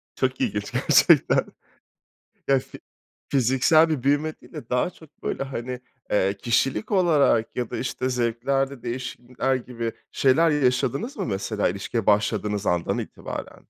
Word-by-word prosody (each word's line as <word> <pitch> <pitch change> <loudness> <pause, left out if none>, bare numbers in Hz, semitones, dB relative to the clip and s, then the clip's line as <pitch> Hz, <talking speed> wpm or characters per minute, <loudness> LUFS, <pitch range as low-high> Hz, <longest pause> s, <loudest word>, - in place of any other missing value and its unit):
Çok 130 0 -1
ilginç 105 0 -2
gerçekten. - - +4 1.0
Ya 135 - +5
fi 130 - -11 0.5
fiziksel 135 +5 +4
bir 155 -6 -1
büyüme 145 +3 +1
değil - - -18
de 145 -7 -9
daha 125 +8 +1
çok 160 -4 -19
böyle - - -2
hani, 125 -2 -5 0.3
eee 100 -1 +1
,kişilik 130 - 0
olarak 150 - +3
ya 125 -2 -2
da - - -4
işte 130 +1 -2
zevklerde 125 +2 -1
değişiklikler 125 +1 -3
gibi 120 -2 -4 0.2
şeyler 150 +5 +4
yaşadınız 140 - 0
mı - - -3
mesela 105 0 -1
ilişkiye 100 +4 -3
başladığınız 105 0 +1
andan 85 -1 0
itibaren? - - -7
125 Hz, 135 wpm, -24 LUFS, 115-140 Hz, 1.0 s, Ya